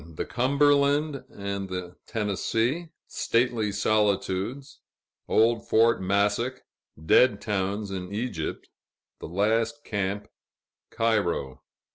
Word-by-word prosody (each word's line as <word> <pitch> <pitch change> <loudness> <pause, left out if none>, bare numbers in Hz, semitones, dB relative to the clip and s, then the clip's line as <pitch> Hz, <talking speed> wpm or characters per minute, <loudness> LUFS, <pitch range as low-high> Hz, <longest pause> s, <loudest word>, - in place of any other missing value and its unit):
The - - -3
Cumberland 140 +2 +2
and 100 -1 -5
the 90 -1 -5
Tennessee 115 - -1 0.2
Stately 115 -3 0
Solitudes 105 +5 0 0.5
Old 115 +1 +2
Fort 115 -1 +4
Massac 100 +6 0 0.4
Dead 120 +4 +5
towns 100 0 -2
in 90 -1 -5
Egypt 105 -7 -4 0.5
The - - -7
last 110 - 0
camp 100 -1 -2 0.6
Cairo. 100 - 0
110 Hz, 90 wpm, -26 LUFS, 100-125 Hz, 0.6 s, Dead